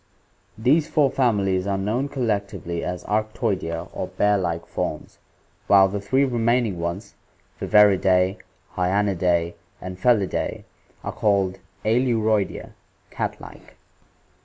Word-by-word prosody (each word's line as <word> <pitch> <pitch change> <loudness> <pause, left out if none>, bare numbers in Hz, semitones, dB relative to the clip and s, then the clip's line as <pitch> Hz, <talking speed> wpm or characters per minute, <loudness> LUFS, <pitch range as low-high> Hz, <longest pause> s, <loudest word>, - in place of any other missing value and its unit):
These 140 +8 +3
four 145 -4 +2
families 100 -7 +1
are 100 -1 0
known 115 +8 -1
collectively 100 -9 -2
as 90 0 -4
Arctoidea 100 -6 -2
or - - -4
bear 105 0 +1
like 85 -3 -2
forms, - - -5 0.5
while 95 -1 +6
the 100 +1 -4
three 130 +8 +2
remaining 115 -5 +1
ones, 85 +3 -4 0.5
Viverridac, 95 -2 +4 0.3
Hyacnidae, 90 -2 +1 0.3
and 90 0 -8
Felidae, 105 -3 +1 0.4
are - - -3
called 95 -2 +1 0.3
iEluroidea 110 -4 +1 0.4
(cat - - -3
like). - - -13
100 Hz, 110 wpm, -23 LUFS, 90-115 Hz, 0.5 s, while